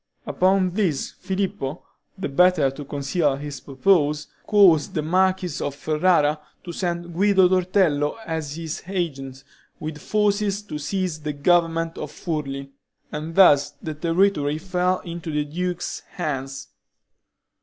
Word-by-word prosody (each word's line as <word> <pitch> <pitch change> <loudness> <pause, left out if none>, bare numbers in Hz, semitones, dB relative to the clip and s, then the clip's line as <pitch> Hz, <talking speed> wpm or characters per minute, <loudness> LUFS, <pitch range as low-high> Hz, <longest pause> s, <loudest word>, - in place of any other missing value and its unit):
Upon 185 0 +2
this 180 -8 -1
Filippo, 190 -6 -3 0.3
the 190 - -3
better 155 -1 +4
to 145 +2 -8
conceal 140 +1 0
his 140 -1 -6
purpose, 150 +1 +2 0.2
caused 190 -8 +5
the 155 - 0
Marquis 185 0 +1
of 140 -1 -3
Ferrara 155 0 +2 0.2
to 175 - -6
send 175 -1 -3
Guido 190 +1 +4
Torello 180 -5 +2
as 160 -3 -4
his 165 -1 -5
agent, 135 -8 -4 0.4
with 155 -1 -5
forces, 210 -1 +1
to 150 -7 -6
seize 180 +1 -2
the 150 0 -3
government 165 +2 +1
of - - -5
Furli, 140 -4 -4 0.4
and 155 +2 -5
thus 145 -7 +6
the 155 - -5
territory 165 -2 +1
fell 180 +1 0
into 170 -1 -7
the 150 0 0
duke's 175 +3 -3
hands. 135 -5 -4
165 Hz, 130 wpm, -23 LUFS, 145-185 Hz, 0.4 s, thus